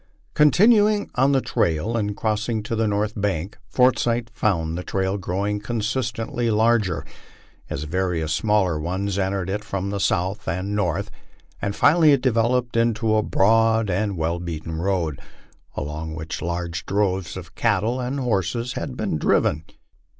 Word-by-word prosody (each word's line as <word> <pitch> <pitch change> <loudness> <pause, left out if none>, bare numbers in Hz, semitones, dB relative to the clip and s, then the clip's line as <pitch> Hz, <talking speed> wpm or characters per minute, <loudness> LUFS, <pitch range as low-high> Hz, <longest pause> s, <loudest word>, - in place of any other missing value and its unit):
Continuing 210 +7 +4
on 135 +2 +3
the 135 -2 +3
trail 85 +6 0
and 105 -3 -1
crossing 110 0 -1
to 115 - -3
the 110 0 +1
north 105 +1 0
bank, 100 -2 -2
Forsyth 120 +1 +2
found 85 -8 0
the 90 - -3
trail 95 +1 -1
growing 100 +3 -2
constantly 115 +1 -2
larger, 110 -5 +2 0.6
as 75 - -3
various 80 -1 -1
smaller 95 -4 +1
ones 95 +4 -2
en 95 0 0
tered 95 -2 -2
it 105 +2 -3
from 100 -2 -3
the 100 - -2
south 95 +1 0
and 95 +5 -2
north, 100 -1 -1 0.5
and 100 0 -2
finally 155 -1 +5
it 135 - +2
developed 120 0 +1
into 115 -1 +2
a 110 - +3
broad 110 +1 +3
and 100 +1 -1
well 85 +2 -1
beaten 80 -1 -5
road, 85 -6 -1 0.6
along 80 +2 -4
which 80 0 -5
large 85 0 -3
droves 95 -3 0
of - - -9
cattle 110 +6 +1
and 130 +3 -2
horses 120 +2 -1
had 130 -3 -5
been 100 -8 -1
driven. 80 +1 +2
105 Hz, 150 wpm, -23 LUFS, 90-115 Hz, 0.6 s, finally